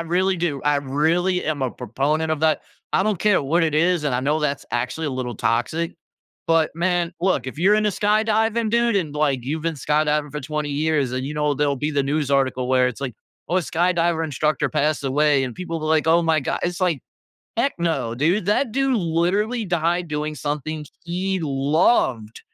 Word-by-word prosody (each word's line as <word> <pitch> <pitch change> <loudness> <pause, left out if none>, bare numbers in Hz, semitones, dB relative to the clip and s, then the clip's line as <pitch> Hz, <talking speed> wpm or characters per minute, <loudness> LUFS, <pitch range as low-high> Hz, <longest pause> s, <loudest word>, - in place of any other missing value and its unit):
really 185 +3 +1
do, 165 -6 -2
I 145 0 +3
really 160 +7 +1
am 150 -2 -2
a 130 - 0
proponent 150 +7 -1
of 155 - -1
that. 160 -1 +2 0.3
I - - +3
don't 210 -3 0
care 205 -4 +3
what 165 +5 +2
it 155 -2 -1
is, 170 0 +2
and 140 -4 0
I 125 - +1
know 145 +4 +1
that's 145 -2 -1
actually 125 +6 -2
a - - -3
little 125 -3 -4
toxic, 120 +11 -1 0.5
but, 165 -1 +3
man, 175 0 0
look, 170 -8 +1
if 130 - -6
you're 195 +5 +4
into 215 -1 +2
skydiving, 220 +2 +1
dude, 235 -1 +2
and, 155 -7 -2
like, 140 -5 0
you've 155 +3 -3
been 165 -1 -1
skydiving 150 +1 0
for 150 - -4
20 150 +1 -3
years, 145 -3 0
and, 130 +1 -2
you 150 - -4
know, 150 -1 +1
there'll 140 0 0
be 150 +3 -2
the 140 - +1
news 145 +1 -1
article 130 -2 +1
where 130 -1 +3
it's 125 - -8
like, 130 -4 -4 0.3
"Oh, 180 - +1
a - - +1
skydiver 170 -1 +1
instructor 150 +1 0
passed 150 +1 0
away," 140 0 +2
and 125 -2 -5
people 170 -2 -4
will 155 - -3
be - - +1
like, 160 -1 +2
"Oh 170 +1 +5
my 160 -1 +2
god," 135 - -2
it's 175 +1 -2
like, 175 -7 +1 0.6
"Heck 275 +4 +1
no, 140 -9 -1
dude. 170 - +1
That 215 +3 +1
dude 270 +1 +1
literally 195 +6 0
died 175 0 0
doing 150 0 -3
something 150 +2 -4 0.2
he 185 +2 -2
loved, 135 - +1
155 Hz, 205 wpm, -22 LUFS, 140-175 Hz, 0.6 s, Oh